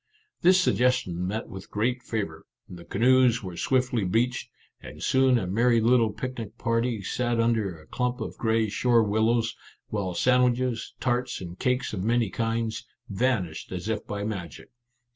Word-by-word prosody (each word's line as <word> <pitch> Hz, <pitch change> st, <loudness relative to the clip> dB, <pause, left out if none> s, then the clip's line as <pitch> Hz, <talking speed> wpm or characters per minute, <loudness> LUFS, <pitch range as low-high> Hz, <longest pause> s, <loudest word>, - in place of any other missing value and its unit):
This 185 Hz, +2 st, +6 dB
suggestion 125 Hz, -, +1 dB
met 110 Hz, +4 st, -3 dB
with 95 Hz, +1 st, -10 dB
great 120 Hz, +4 st, -1 dB
favour; 100 Hz, -11 st, -4 dB, 0.2 s
the 85 Hz, -1 st, -10 dB
canoes 120 Hz, +3 st, +3 dB
were 90 Hz, -2 st, -6 dB
swiftly 125 Hz, 0 st, +1 dB
beached, 120 Hz, +6 st, 0 dB, 0.3 s
and -, -, -10 dB
soon 130 Hz, -1 st, +4 dB
a 110 Hz, -, -1 dB
merry 115 Hz, +5 st, +3 dB
little 115 Hz, -1 st, +3 dB
picnic 115 Hz, 0 st, -6 dB
party 115 Hz, -2 st, 0 dB
sat 120 Hz, +4 st, -1 dB
under 110 Hz, -7 st, 0 dB
a 75 Hz, -, -17 dB
clump 125 Hz, +5 st, -2 dB
of 110 Hz, -, -5 dB
gray 110 Hz, -1 st, +1 dB
shore 120 Hz, +2 st, +3 dB
willows, 110 Hz, +2 st, +1 dB, 0.3 s
while 95 Hz, -4 st, -2 dB
sandwiches, 125 Hz, +2 st, +1 dB
tarts, 125 Hz, 0 st, -1 dB
and 90 Hz, -1 st, -8 dB
cakes 125 Hz, -2 st, 0 dB
of 95 Hz, -3 st, -3 dB
many 115 Hz, -2 st, +1 dB
kinds, 115 Hz, +1 st, -2 dB, 0.3 s
vanished 100 Hz, -7 st, -1 dB
as 90 Hz, +2 st, -5 dB
if 110 Hz, -1 st, -3 dB
by 100 Hz, -1 st, -4 dB
magic. 90 Hz, -, -6 dB
115 Hz, 155 wpm, -26 LUFS, 100-125 Hz, 0.3 s, This